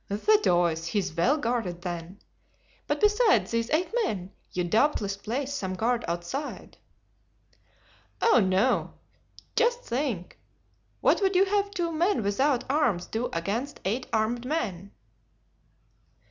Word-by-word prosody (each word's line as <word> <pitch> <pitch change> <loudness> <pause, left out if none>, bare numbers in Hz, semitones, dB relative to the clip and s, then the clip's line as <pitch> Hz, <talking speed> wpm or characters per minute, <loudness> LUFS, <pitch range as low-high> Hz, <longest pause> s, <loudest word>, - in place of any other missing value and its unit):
"The 315 - +3
deuce, 170 - +2
he 210 - -2
is 185 -5 -1
well 245 - +3
guarded, 225 - -2
then. 175 +1 -5 0.7
But - - 0
besides 420 +1 +3
these 230 0 0
eight 340 +7 0
men, 195 - -3 0.2
you 180 - -1
doubtless 205 - +1
place 255 +7 -3
some 190 -9 -3
guard 235 +4 0
outside?" 175 - -5 1.4
"Oh, 450 - +5
no! 190 +4 +1 0.6
Just 480 +1 +2
think. 240 - -3 0.6
What - - +3
would 385 -1 +2
you 380 +2 +5
have 400 0 +1
two 350 -4 -2
men 330 - +1
without 250 +6 +1
arms 250 - +1
do 230 +3 -3
against 210 +12 -3
eight 225 +7 -1
armed 225 +2 0
men?" 205 - -3
235 Hz, 130 wpm, -27 LUFS, 185-305 Hz, 1.4 s, Oh